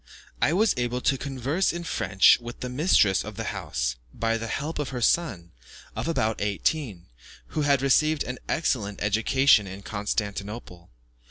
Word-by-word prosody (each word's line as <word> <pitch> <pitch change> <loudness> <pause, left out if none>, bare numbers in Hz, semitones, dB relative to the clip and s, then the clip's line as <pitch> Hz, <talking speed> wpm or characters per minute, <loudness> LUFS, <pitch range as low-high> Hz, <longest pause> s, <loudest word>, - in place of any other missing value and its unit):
I - - +3
was 210 +6 +3
able 120 0 -1
to 135 - +2
converse 140 +6 -1
in 170 0 -5
French 95 - +4
with 120 0 -9
the 125 - -3
mistress 125 - +3
of 105 0 -8
the 115 - -3
house, 75 -9 -3
by 115 - -1
the 115 0 -4
help 150 +7 -3
of 145 - -2
her 125 - -4
son, 110 - 0 0.4
of - - -3
about 110 -9 0
eighteen, 105 - -1 0.4
who 155 - -2
had 140 -2 +2
received 155 +3 +3
an 125 0 -6
excellent 110 -11 -1
education 110 +1 +3
in 95 +2 -9
Constantinople. 100 -3 -4
120 Hz, 160 wpm, -26 LUFS, 100-145 Hz, 0.4 s, French